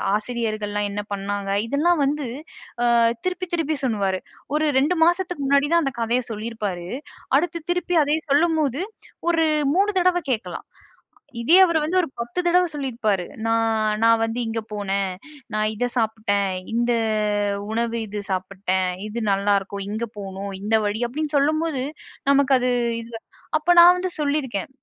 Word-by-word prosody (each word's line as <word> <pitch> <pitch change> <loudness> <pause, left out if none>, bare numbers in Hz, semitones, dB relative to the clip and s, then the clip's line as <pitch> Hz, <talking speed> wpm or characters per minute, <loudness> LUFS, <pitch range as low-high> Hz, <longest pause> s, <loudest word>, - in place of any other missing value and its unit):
ஆசிரியர்கள்லாம் 215 -2 -2
என்ன 205 +1 -3
பண்ணாங்க. 200 0 -3 0.2
இதெல்லாம் 305 +5 +2
வந்து 285 -1 -1 0.7
அ - - +4 0.3
திருப்பி 370 0 -2
திருப்பி 315 -2 -1
சொல்லுவாரு. 200 -6 0 0.4
ஒரு 310 +1 +2
2 310 +6 +1
மாசத்துக்கு 350 -4 0
முன்னாடி 280 +1 +3
தான் 340 -1 +4
அந்த 270 - -1
கதைய 235 +2 +1
சொல்லிருப்பாரு. 210 -5 -4 0.5
அடுத்து 335 +2 -1
திருப்பி 355 0 -1
அதே 295 +2 +1
சொல்லும்போது 305 -2 +2 0.5
ஒரு 330 -1 +3 0.3
3 400 +3 +3
தடவ 365 0 +3 0.2
கேட்கலாம். 225 - -5 0.7
இதே 310 +9 +5
அவர் 335 -2 +1
வந்து 330 +5 0
ஒரு 350 - +1
10 235 +7 -3
தடவ 360 +1 +4
சொல்லிருப்பாரு. 235 -9 -1 0.2
"நான் 225 -1 +1
நான் 230 0 +5
வந்து 225 +2 -2
இங்க 225 0 -2
போனேன், 200 -2 -1 0.4
நான் 215 0 +1
இத 245 +4 0
சாப்ட்டேன். 215 -4 0 0.2
இந்த 240 +1 +1 0.8
உணவு 230 +1 -1
இது 210 0 -5
சாப்புட்டேன். 185 0 -1 0.2
இது 220 +2 -4
நல்லாருக்கும். 200 0 0
இங்க 220 +3 -2
போனூம். 195 0 -6
இந்த 215 +2 +1
வழி." 205 +1 -1
அப்டின்னு 300 +4 -4
சொல்லும்போது, 305 0 +1 0.5
நமக்கு 280 -1 +4
அது 250 0 0 0.3
இது, 230 0 -12 0.5
அப்போ 350 +3 +3
நான் 345 +1 +9
வந்து 365 0 -2
சொல்லிருக்கேன். 285 -9 -1
235 Hz, 145 wpm, -23 LUFS, 205-305 Hz, 0.8 s, நான்